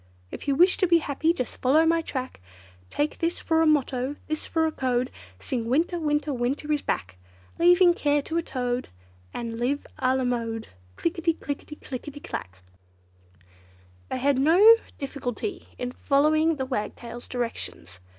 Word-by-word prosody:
If -, -, -8 dB
you 280 Hz, -, +2 dB
wish 355 Hz, +5 st, +5 dB
to 370 Hz, -, +2 dB
be 340 Hz, 0 st, +6 dB
happy, 315 Hz, +1 st, +1 dB
just 295 Hz, -9 st, -4 dB
follow 295 Hz, +5 st, +4 dB
my 330 Hz, 0 st, +3 dB
track, 260 Hz, -, -5 dB, 0.5 s
Take 295 Hz, +1 st, -1 dB
this 335 Hz, +1 st, 0 dB
for 320 Hz, -1 st, +2 dB
a 325 Hz, -, +4 dB
motto, 275 Hz, -2 st, +1 dB
this 310 Hz, 0 st, -4 dB
for 320 Hz, -1 st, +1 dB
a 320 Hz, -, 0 dB
code, 255 Hz, -3 st, -1 dB, 0.3 s
Sing 235 Hz, -, -3 dB
'winter, 335 Hz, +6 st, +1 dB
winter, 295 Hz, -1 st, 0 dB
winter 260 Hz, +5 st, -2 dB
is 295 Hz, -1 st, +1 dB
back!' 95 Hz, 0 st, -3 dB, 0.4 s
Leave 355 Hz, +2 st, +6 dB
care 290 Hz, -2 st, +1 dB
to 330 Hz, -, -3 dB
a -, -, +2 dB
toad, 250 Hz, -5 st, -3 dB, 0.4 s
and 230 Hz, -1 st, -5 dB
live 275 Hz, +4 st, -1 dB
a 255 Hz, 0 st, +2 dB
la 260 Hz, -, 0 dB
mode! 230 Hz, -2 st, -2 dB, 0.3 s
Click 335 Hz, +1 st, -2 dB
i -, -, -5 dB
ti, 330 Hz, 0 st, +2 dB
click 285 Hz, -3 st, -5 dB
i 290 Hz, -3 st, -6 dB
ti 290 Hz, 0 st, -10 dB
clack! 95 Hz, -, -7 dB, 1.5 s
They -, -, -2 dB
had 270 Hz, +1 st, +2 dB
no 365 Hz, +11 st, +8 dB, 0.2 s
difficulty 275 Hz, -, -4 dB
in 250 Hz, 0 st, -3 dB
following 310 Hz, +5 st, +2 dB
the 265 Hz, -2 st, -3 dB
Wagtail's 240 Hz, 0 st, -5 dB
directions. 230 Hz, -, -5 dB
285 Hz, 170 wpm, -26 LUFS, 250-320 Hz, 1.5 s, no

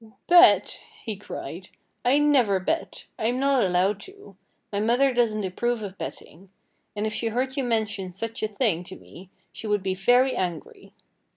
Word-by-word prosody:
"Bet!" 355 Hz, +1 st, +5 dB, 0.2 s
he 220 Hz, -, -4 dB
cried. 185 Hz, -2 st, -8 dB, 0.3 s
"I 255 Hz, +3 st, +4 dB
never 265 Hz, -10 st, +3 dB
bet! 320 Hz, -, -3 dB
I'm 240 Hz, +3 st, 0 dB
not 275 Hz, -2 st, +3 dB
allowed 190 Hz, +2 st, +1 dB
to. 405 Hz, +2 st, -14 dB, 0.4 s
My 200 Hz, -, 0 dB
mother 245 Hz, +5 st, +2 dB
doesn't 225 Hz, -3 st, +1 dB
approve 225 Hz, +5 st, -2 dB
of 195 Hz, -2 st, -7 dB
betting. 185 Hz, +5 st, -9 dB, 0.5 s
And 210 Hz, +1 st, -2 dB
if 215 Hz, -, -2 dB
she 230 Hz, -, -1 dB
heard 255 Hz, +4 st, -2 dB
you 275 Hz, -, -1 dB
mention 220 Hz, -5 st, -1 dB
such 225 Hz, +5 st, -5 dB
a 215 Hz, -, 0 dB
thing 205 Hz, -5 st, 0 dB
to 190 Hz, -, -8 dB
me 185 Hz, +1 st, -14 dB, 0.2 s
she 225 Hz, -, -7 dB
would 210 Hz, -2 st, 0 dB
be 190 Hz, -1 st, -1 dB
very 245 Hz, +7 st, +3 dB
angry." 175 Hz, -4 st, -5 dB
220 Hz, 170 wpm, -25 LUFS, 190-250 Hz, 0.5 s, Bet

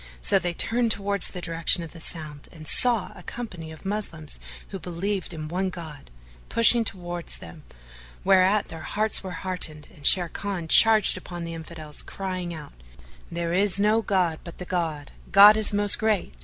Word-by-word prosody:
''[FN#434] -, -, -16 dB, 0.2 s
So -, -, +3 dB
they 175 Hz, +1 st, -3 dB
turned 235 Hz, +3 st, +1 dB
towards 200 Hz, -2 st, +1 dB
the 180 Hz, -, -8 dB
direction 165 Hz, +1 st, +1 dB
of 165 Hz, -, -9 dB
the 165 Hz, -, -13 dB
sound 155 Hz, -4 st, -5 dB
and 155 Hz, -2 st, -13 dB
saw 235 Hz, 0 st, +1 dB
a -, -, -12 dB
company 185 Hz, -10 st, -8 dB
of 160 Hz, +4 st, -14 dB
Moslems 180 Hz, -, -1 dB, 0.3 s
who 195 Hz, -, -7 dB
believed 180 Hz, +3 st, -4 dB
in 155 Hz, -2 st, -5 dB
one 185 Hz, +4 st, -2 dB
God, 160 Hz, -6 st, -10 dB, 0.4 s
pushing 230 Hz, +1 st, +5 dB
towards 175 Hz, -4 st, -3 dB
them, 160 Hz, -, -12 dB, 0.6 s
whereat 195 Hz, +2 st, +3 dB
their 165 Hz, -1 st, -8 dB
hearts 215 Hz, +4 st, +1 dB
were 185 Hz, 0 st, -7 dB
heartened 160 Hz, -5 st, -2 dB
and 150 Hz, -, -18 dB
Sharrkan 180 Hz, 0 st, +2 dB
charged 215 Hz, -2 st, +6 dB
upon 175 Hz, -1 st, -8 dB
the 165 Hz, 0 st, -6 dB
Infidels 160 Hz, -2 st, -7 dB
crying 185 Hz, -2 st, -5 dB
out, 155 Hz, -3 st, -9 dB, 0.6 s
"There 170 Hz, 0 st, -3 dB
is 200 Hz, +1 st, +2 dB
no 215 Hz, +2 st, +2 dB
god 180 Hz, -7 st, 0 dB
but 170 Hz, -, -11 dB
the 180 Hz, -, -7 dB
God! 160 Hz, -5 st, -3 dB, 0.2 s
God 205 Hz, +2 st, +9 dB
is 215 Hz, -1 st, +3 dB
most 205 Hz, 0 st, +3 dB
great! 215 Hz, -, 0 dB
180 Hz, 175 wpm, -25 LUFS, 165-200 Hz, 0.6 s, God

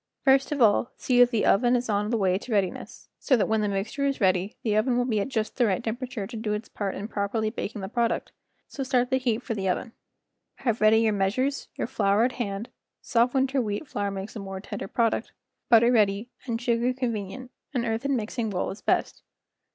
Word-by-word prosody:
First 270 Hz, +1 st, +4 dB
of 285 Hz, -4 st, +2 dB
all 220 Hz, +2 st, +3 dB
see 250 Hz, -2 st, +1 dB
that 245 Hz, 0 st, +7 dB
the 230 Hz, -4 st, 0 dB
oven 245 Hz, +4 st, +4 dB
is 245 Hz, 0 st, -1 dB
on 210 Hz, -1 st, 0 dB
the 235 Hz, -, +1 dB
way 190 Hz, -2 st, +2 dB
to 245 Hz, -, -9 dB
readiness, 195 Hz, -4 st, -2 dB
so 260 Hz, -, +3 dB
that 215 Hz, -, +2 dB
when 220 Hz, -1 st, +1 dB
the 210 Hz, -, +1 dB
mixture 205 Hz, +8 st, -2 dB
is 275 Hz, -, -1 dB
ready 190 Hz, 0 st, +1 dB
the 215 Hz, -3 st, +1 dB
oven 240 Hz, +3 st, +2 dB
will 245 Hz, -, +2 dB
be 225 Hz, -4 st, 0 dB
at 200 Hz, -, -1 dB
just 225 Hz, -5 st, -3 dB
the 245 Hz, -3 st, +4 dB
right 195 Hz, +2 st, 0 dB
tem¬ 225 Hz, -1 st, -1 dB
perature 250 Hz, -5 st, -5 dB
to 235 Hz, -, -9 dB
do 215 Hz, -1 st, -2 dB
its 210 Hz, +2 st, -4 dB
part 200 Hz, -2 st, -4 dB
in 200 Hz, -, -5 dB
properly 215 Hz, +1 st, -1 dB
baking 215 Hz, -2 st, -5 dB
the 190 Hz, -, -4 dB
product; 235 Hz, +2 st, -1 dB, 0.4 s
so 275 Hz, -, -7 dB
start 250 Hz, -2 st, +1 dB
the 260 Hz, -, +4 dB
heat 245 Hz, -2 st, -1 dB
for 230 Hz, -, -3 dB
the 195 Hz, -3 st, -1 dB
oven. 225 Hz, +6 st, -2 dB, 0.6 s
Have 235 Hz, -5 st, -1 dB
ready 215 Hz, +1 st, +6 dB
your 220 Hz, -1 st, +2 dB
measures, 215 Hz, +8 st, 0 dB
your -, -, -2 dB
flour 210 Hz, -3 st, +2 dB
at 250 Hz, -, +2 dB
hand 220 Hz, -1 st, -4 dB, 0.3 s
(soft 240 Hz, +2 st, +1 dB
winter 265 Hz, 0 st, +2 dB
wheat 210 Hz, +5 st, -3 dB
flour 205 Hz, -4 st, -2 dB
makes 195 Hz, +2 st, -6 dB
a -, -, -4 dB
more 195 Hz, -1 st, -6 dB
tender 205 Hz, 0 st, -6 dB
product), 230 Hz, +1 st, 0 dB, 0.4 s
butter 235 Hz, +1 st, +6 dB
ready, 210 Hz, 0 st, +2 dB, 0.2 s
and 230 Hz, -2 st, -1 dB
sugar 240 Hz, +1 st, +1 dB
con¬ 250 Hz, -2 st, -1 dB
venient—an 240 Hz, +4 st, -5 dB
earthen 235 Hz, +5 st, 0 dB
mixing 225 Hz, 0 st, -2 dB
bowl 185 Hz, -3 st, -2 dB
is 195 Hz, -, -9 dB
best. -, -, 0 dB
225 Hz, 225 wpm, -26 LUFS, 205-245 Hz, 0.6 s, that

